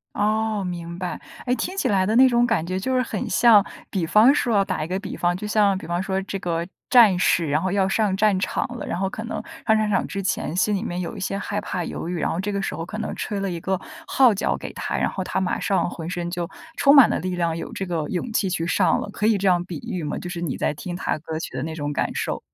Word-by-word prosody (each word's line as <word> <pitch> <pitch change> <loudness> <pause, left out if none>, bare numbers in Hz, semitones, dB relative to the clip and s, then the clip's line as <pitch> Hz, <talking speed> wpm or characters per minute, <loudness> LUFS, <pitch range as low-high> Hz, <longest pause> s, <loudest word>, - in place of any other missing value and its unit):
哦， 215 0 0
明 170 -1 -5
白。 180 -1 -4 0.3
哎， 250 - +1
听 370 +8 -4
起 275 - +1
来 195 -5 +2
的 215 +3 +1
那 260 +2 +8
种 240 -1 +3
感 225 -9 +1
觉 185 +2 -2
就 260 +6 -1
是 255 - +3
很 225 -4 -3
像 220 -4 +6 0.3
比 185 -4 0
方 220 +9 +6
说 235 -7 +2
哦， 195 - +2
打 155 - -2
一 - - -4
个 185 +2 -2
比 200 -1 -6
方， 175 0 +1
就 210 - -6
像 205 -2 +3
比 - - -8
方 175 +1 -1
说 190 0 -1
这 195 0 -4
个 170 -2 -2 0.2
战 225 -8 +7
士 170 -2 +2
然 150 +2 +1
后 185 0 -1
要 195 -1 +2
上 200 0 +1
战 210 -2 +3
场 185 - -1
了， - - -6
然 - - -2
后 195 - +1
可 220 - -6
能 230 - -4 0.3
上 220 0 +5
战 215 - +1
场 195 - +1
之 195 - -4
前 175 -3 -1
心 210 +2 +2
里 195 - -2
面 180 -5 -3
有 180 +5 -4
一 200 - -7
些 195 +1 -2
害 205 +1 -3
怕、 180 -3 -3
犹 165 - -5
豫， 175 -2 -2
然 - - 0
后 165 - -2
这 200 +2 -2
个 200 - -1
时 - - -3
候 165 - -4
可 215 - -7
能 220 - -4
吹 205 - -3
了 195 -1 -1
一 170 - -4
个 190 +2 -1 0.3
号 255 -5 +5
角 200 - 0
给 - - -8
他， - - -3
然 - - +1
后 190 - -4
他 - - -2
马 190 -1 -1
上 195 - +1
浑 165 -1 -6
身 175 -1 -3
就 175 -1 -3 0.3
充 280 0 +5
满 275 -5 +9
了 - - 0
力 185 0 -3
量， 170 -2 0
有 - - -6
这 195 - -4
个 165 -4 -2
勇 220 +6 -3
气 195 - +1
去 170 -2 -1
上 170 - +2
了， - - -5
可 210 - 0
以 220 - +4
这 195 0 0
样 175 -1 +3
比 175 -3 -6
喻 180 -3 -3
吗？ 150 - -3
就 - - -6
是 175 -1 -5
你 160 -6 -2
在 - - 0
听 175 +4 -6
她 180 - -1
的 - - -4
歌 160 0 -5
曲 - - -6
的 - - -2
那 160 0 -4
种 145 -2 -3
感 - - 0
受。 - - -2
190 Hz, 315 characters per minute, -23 LUFS, 175-210 Hz, 0.3 s, 满